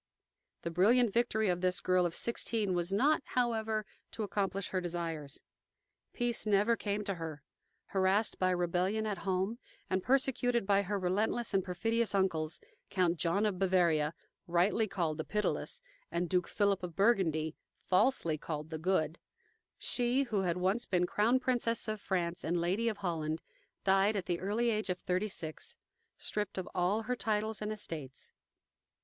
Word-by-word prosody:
The 170 Hz, -, -2 dB
brilliant 215 Hz, +6 st, +4 dB
victory 230 Hz, -2 st, +2 dB
of 180 Hz, -1 st, 0 dB
this 185 Hz, 0 st, +1 dB
girl 185 Hz, -1 st, +3 dB
of 170 Hz, -, -6 dB
sixteen 225 Hz, -4 st, 0 dB
was 175 Hz, +1 st, 0 dB
not, 280 Hz, +11 st, +3 dB
however, 225 Hz, -4 st, 0 dB, 0.3 s
to 220 Hz, -, -3 dB
accomplish 195 Hz, -1 st, -1 dB
her 185 Hz, -, -1 dB
desires. 165 Hz, -5 st, -4 dB, 0.7 s
Peace 240 Hz, -1 st, -1 dB
never 210 Hz, +3 st, +4 dB
came 210 Hz, -1 st, -2 dB
to 200 Hz, -, -2 dB
her. 160 Hz, -4 st, -6 dB, 0.4 s
Harassed 195 Hz, +3 st, +1 dB
by 185 Hz, -, +3 dB
rebellion 180 Hz, +4 st, +1 dB
at 205 Hz, -4 st, -2 dB
home, 190 Hz, +5 st, -1 dB, 0.3 s
and 185 Hz, 0 st, +2 dB
persecuted 245 Hz, -2 st, +2 dB
by 200 Hz, 0 st, +4 dB
her 200 Hz, +1 st, -2 dB
relentless 205 Hz, +5 st, 0 dB
and 195 Hz, -1 st, +3 dB
perfidious 225 Hz, +5 st, 0 dB
uncles, 170 Hz, -5 st, 0 dB, 0.3 s
Count 180 Hz, -2 st, +1 dB
John 175 Hz, +6 st, +1 dB
of 200 Hz, -4 st, -1 dB
Bavaria, 170 Hz, -5 st, +2 dB, 0.3 s
rightly 180 Hz, +6 st, +2 dB
called 165 Hz, -6 st, -2 dB
"the -, -, 0 dB
Pitiless," 210 Hz, -, -2 dB, 0.3 s
and 175 Hz, +1 st, 0 dB
Duke 180 Hz, 0 st, +1 dB
Philip 200 Hz, -2 st, +1 dB
of 175 Hz, -3 st, -6 dB
Burgundy, 165 Hz, -7 st, +2 dB, 0.3 s
falsely 185 Hz, -, +2 dB
called 155 Hz, 0 st, -5 dB
"the 160 Hz, -, -4 dB
Good," 165 Hz, -2 st, 0 dB, 0.6 s
she, 245 Hz, +2 st, +1 dB
who 215 Hz, -7 st, 0 dB
had 180 Hz, -2 st, 0 dB
once 190 Hz, +6 st, +1 dB
been 180 Hz, -1 st, +2 dB
Crown 225 Hz, +7 st, +2 dB
Princess 240 Hz, -3 st, 0 dB
of 215 Hz, -1 st, -3 dB
France 175 Hz, -2 st, -1 dB
and 170 Hz, +2 st, 0 dB
Lady 190 Hz, +7 st, +1 dB
of 215 Hz, -, -4 dB
Holland, 160 Hz, -4 st, -2 dB, 0.4 s
died 195 Hz, +2 st, +4 dB
at 195 Hz, -3 st, -2 dB
the 175 Hz, -1 st, -1 dB
early 220 Hz, +5 st, +1 dB
age 215 Hz, -2 st, -1 dB
of 180 Hz, -, 0 dB
thirty 185 Hz, +3 st, -1 dB
six, 160 Hz, -6 st, -3 dB, 0.4 s
stripped 210 Hz, -2 st, -2 dB
of 185 Hz, -, -3 dB
all 190 Hz, +5 st, +1 dB
her 250 Hz, +3 st, -1 dB
titles 215 Hz, -2 st, -1 dB
and 210 Hz, 0 st, -2 dB
estates. 155 Hz, -11 st, -6 dB
195 Hz, 160 wpm, -33 LUFS, 175-220 Hz, 0.7 s, brilliant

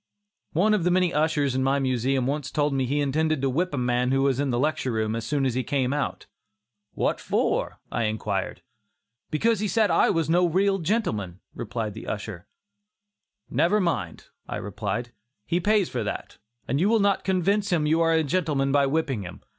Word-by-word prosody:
One 205 Hz, +7 st, +3 dB
of 205 Hz, -5 st, +1 dB
the 180 Hz, 0 st, +2 dB
ushers 150 Hz, -3 st, +1 dB
in 130 Hz, -, 0 dB
my 135 Hz, +1 st, +2 dB
Museum 130 Hz, -1 st, 0 dB
once 140 Hz, -1 st, -2 dB
told 145 Hz, +3 st, 0 dB
me 135 Hz, -2 st, 0 dB
he 145 Hz, +3 st, 0 dB
intended 155 Hz, +2 st, +1 dB
to 135 Hz, -, +2 dB
whip 180 Hz, +7 st, 0 dB
a 145 Hz, -, -3 dB
man 125 Hz, 0 st, +1 dB
who 135 Hz, 0 st, +2 dB
was 135 Hz, -2 st, +1 dB
in 140 Hz, -1 st, 0 dB
the 120 Hz, -, 0 dB
lecture 135 Hz, -1 st, 0 dB
room 110 Hz, -1 st, -1 dB
as 115 Hz, -, -4 dB
soon 145 Hz, -2 st, 0 dB
as 130 Hz, -, +1 dB
he 130 Hz, -, 0 dB
came 135 Hz, -1 st, 0 dB
out. 145 Hz, -1 st, -3 dB, 0.7 s
"What -, -, 0 dB
for?" -, -, -1 dB
I 115 Hz, -, 0 dB
inquired. 105 Hz, -2 st, -3 dB, 0.7 s
"Because 220 Hz, +8 st, +1 dB
he 210 Hz, -, 0 dB
said 215 Hz, +2 st, +2 dB
I -, -, +4 dB
was 165 Hz, -4 st, +1 dB
no 180 Hz, +4 st, +2 dB
gentleman," 115 Hz, -, -1 dB
replied 110 Hz, -2 st, -4 dB
the 110 Hz, -, -9 dB
usher. 100 Hz, -4 st, -5 dB, 1.0 s
"Never 200 Hz, +5 st, +2 dB
mind," 130 Hz, -, -2 dB, 0.2 s
I -, -, -3 dB
replied, 105 Hz, +3 st, -4 dB, 0.3 s
"he 175 Hz, -, 0 dB
pays 205 Hz, 0 st, +2 dB
for 120 Hz, -3 st, -3 dB
that, 105 Hz, -, -6 dB, 0.3 s
and 135 Hz, +4 st, 0 dB
you 190 Hz, +5 st, +3 dB
will 225 Hz, 0 st, +4 dB
not 200 Hz, -1 st, +2 dB
convince 195 Hz, +2 st, +1 dB
him 160 Hz, -4 st, +2 dB
you 160 Hz, +2 st, +2 dB
are 165 Hz, 0 st, +3 dB
a 160 Hz, 0 st, +3 dB
gentleman 145 Hz, -3 st, 0 dB
by 140 Hz, 0 st, +3 dB
whipping 135 Hz, -6 st, -1 dB
him. 90 Hz, -3 st, -9 dB
145 Hz, 195 wpm, -25 LUFS, 125-175 Hz, 1.0 s, I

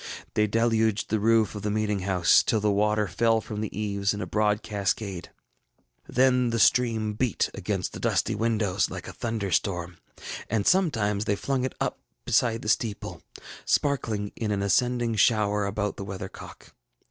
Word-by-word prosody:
They 105 Hz, 0 st, +2 dB
deluged 110 Hz, -1 st, +1 dB
the 110 Hz, -, +2 dB
roof 110 Hz, 0 st, +3 dB
of 105 Hz, -, -6 dB
the 105 Hz, -, -2 dB
meeting 105 Hz, -1 st, 0 dB
house, 90 Hz, -2 st, +4 dB
till 110 Hz, -, +1 dB
the 105 Hz, 0 st, +1 dB
water 105 Hz, +1 st, +1 dB
fell 115 Hz, +5 st, +2 dB
from 110 Hz, -2 st, -6 dB
the 105 Hz, -1 st, -4 dB
eaves 100 Hz, -1 st, -1 dB
in -, -, -6 dB
a -, -, -3 dB
broad 105 Hz, 0 st, 0 dB
cascade; 100 Hz, -2 st, -3 dB, 0.8 s
then 125 Hz, -1 st, +3 dB
the 115 Hz, -, -1 dB
stream 110 Hz, -2 st, +3 dB
beat 115 Hz, 0 st, 0 dB
against -, -, -3 dB
the -, -, -7 dB
dusty 115 Hz, -, +1 dB
windows 105 Hz, -3 st, 0 dB
like -, -, -7 dB
a -, -, -7 dB
thunder 110 Hz, -4 st, -3 dB
storm; 90 Hz, -2 st, -1 dB, 0.5 s
and 110 Hz, -2 st, 0 dB
sometimes 110 Hz, -, +2 dB
they 100 Hz, -, +1 dB
flung 135 Hz, +4 st, -1 dB
it 130 Hz, -, -4 dB
up -, -, -2 dB, 0.3 s
beside 115 Hz, -2 st, +1 dB
the -, -, -6 dB
steeple, 110 Hz, -1 st, -1 dB, 0.4 s
sparkling 110 Hz, -8 st, 0 dB
in 110 Hz, -, -3 dB
an 100 Hz, -1 st, -1 dB
ascending 120 Hz, +2 st, +1 dB
shower 105 Hz, -2 st, +2 dB
about 105 Hz, +1 st, -2 dB
the -, -, -5 dB
weathercock. 95 Hz, -1 st, -9 dB
105 Hz, 170 wpm, -26 LUFS, 100-115 Hz, 0.8 s, house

